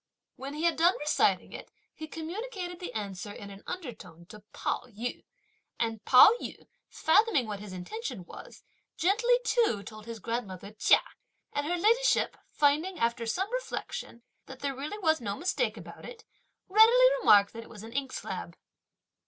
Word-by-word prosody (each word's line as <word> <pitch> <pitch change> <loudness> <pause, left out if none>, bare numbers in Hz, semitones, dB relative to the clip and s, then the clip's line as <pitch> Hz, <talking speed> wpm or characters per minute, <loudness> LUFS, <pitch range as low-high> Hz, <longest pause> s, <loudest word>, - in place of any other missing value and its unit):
When 275 +2 -7
he 310 - -4
had 340 -1 +2
done 345 +3 +4
reciting 295 +1 +1
it, - - -9 0.2
he 315 - -8
communicated 355 +3 -6
the 360 - -6
answer 205 -1 -5
in 200 0 -9
an 195 0 -11
undertone 215 - -8
to 215 - -11
Pao - - -2
yü; 235 +1 -6 0.5
and 225 -2 -2
Pao 255 +10 +9
yü - - -8 0.2
fathoming 320 - +3
what 210 -2 -5
his 205 -1 -9
intention 195 - -6
was, - - -12 0.3
gently 455 +7 +3
too 455 - +2
told 215 +2 -11
his 230 -1 -6
grandmother 210 -3 -5
Chia, 215 - +4 0.5
and 290 +1 -1
her 350 +2 0
ladyship 465 +7 +3
finding, 305 +6 +1
after 235 -2 0
some 380 - -2
reflection, - - -5 0.2
that 265 -1 -11
there 280 -1 -1
was 280 +3 -5
really 320 - 0
no 200 -2 -2
mistake 365 - -1
about - - -11
it, 460 -2 -11 0.4
readily 450 +5 +7
remarked 205 - +5
that 230 - -7
it - - -14
was 215 -2 -11
an 225 - -9
inkslab. 270 +1 -4
280 Hz, 160 wpm, -29 LUFS, -, 0.5 s, Pao